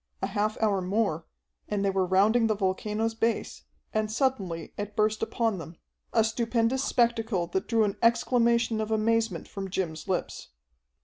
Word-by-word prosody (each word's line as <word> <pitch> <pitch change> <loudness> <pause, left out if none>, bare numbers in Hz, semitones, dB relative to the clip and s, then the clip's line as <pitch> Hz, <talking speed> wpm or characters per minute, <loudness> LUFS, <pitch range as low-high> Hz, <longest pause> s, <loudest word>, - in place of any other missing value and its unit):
A - - -1
half 205 +2 -1
hour 200 -3 +2
more, 185 -4 -1 0.4
and 205 -1 0
they 195 - +2
were 190 -1 +1
rounding 215 +5 +4
the 215 - +1
volcano's 210 +3 -1
base, 225 0 -2 0.3
and 215 0 0
suddenly 210 - -1
it 205 0 -5
burst 215 0 +1
upon 225 -5 0
them, 165 0 -9 0.3
a 225 - +4
stupendous 230 +3 0
spectacle 230 -8 +1
that 190 +3 -3
drew 225 -2 +3
an 205 0 -1
exclamation 235 -1 +3
of 215 - -3
amazement 220 -3 0
from 195 -1 -6
Jim's 170 -4 -3
lips. 185 -2 -3
215 Hz, 160 wpm, -28 LUFS, 195-230 Hz, 0.4 s, rounding